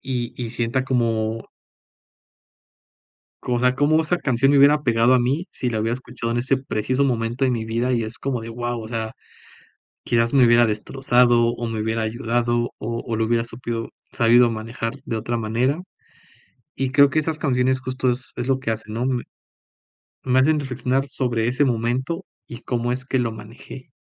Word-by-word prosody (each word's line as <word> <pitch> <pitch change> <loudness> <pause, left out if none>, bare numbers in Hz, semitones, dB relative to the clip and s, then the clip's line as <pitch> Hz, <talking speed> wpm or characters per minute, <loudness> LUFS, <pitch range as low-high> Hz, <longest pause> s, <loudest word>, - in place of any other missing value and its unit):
y 125 -3 -3
y 115 - -4
sienta 120 +2 -1
cómo 115 -3 -1 1.9
como, 125 - -1
o - - 0
sea, 125 0 +2
cómo 155 +3 +3
esa 175 +3 +1
canción 135 -2 +2
me 140 - +4
hubiera 145 +2 +5
pegado 120 +1 +3
a 125 - +5
mi 140 +9 0
si 125 - -2
la 110 -2 -2
hubiera 115 +2 0
escuchado 120 -2 -5
en 120 - 0
ese 130 +2 +1
preciso 130 +1 -1
momento 120 0 0
en 125 - +1
mi 110 -1 -3
vida. 120 +3 -1
Y, 115 -2 +1
es 110 +2 -5
como 130 -4 -3
de, 115 - -7
guau, 120 0 -3
o 110 - -8
sea, 110 -1 -3 0.9
quizás 115 -1 +1
me 130 -2 +6
hubiera 120 0 +5
destrozado 120 +1 +2
o 120 0 -4
me 110 -1 -3
hubiera 110 +1 -1
ayudado 120 +1 0
o 115 +1 -4
o 115 -2 -2
lo 110 - +1
hubiera 115 0 +1
supido 115 -1 -5 0.2
sabido 120 +1 +4
manejar 115 +2 -4
de 115 - -3
otra 120 +2 -2
manera. 120 +8 0 1.0
Y, 135 0 -1
creo 140 0 +5
que 155 - 0
esas 155 0 -2
canciones 130 -2 +1
justo 130 0 -1
es 125 +1 -4
es 120 +1 -3
lo 135 0 +2
que 130 -4 -3
hacen, 110 0 -6
¿no?, 120 +2 -1 1.2
me 130 0 +3
hacen 150 +3 +3
reflexionar 135 0 -1
sobre 120 -4 -1
ese 130 +4 +2
momento 130 +9 -1 0.2
y 120 - -8
cómo 120 0 -2
es 125 0 -3
que 130 - 0
lo 115 -2 0
manejé. 110 +5 -11
120 Hz, 185 wpm, -22 LUFS, 115-130 Hz, 1.9 s, me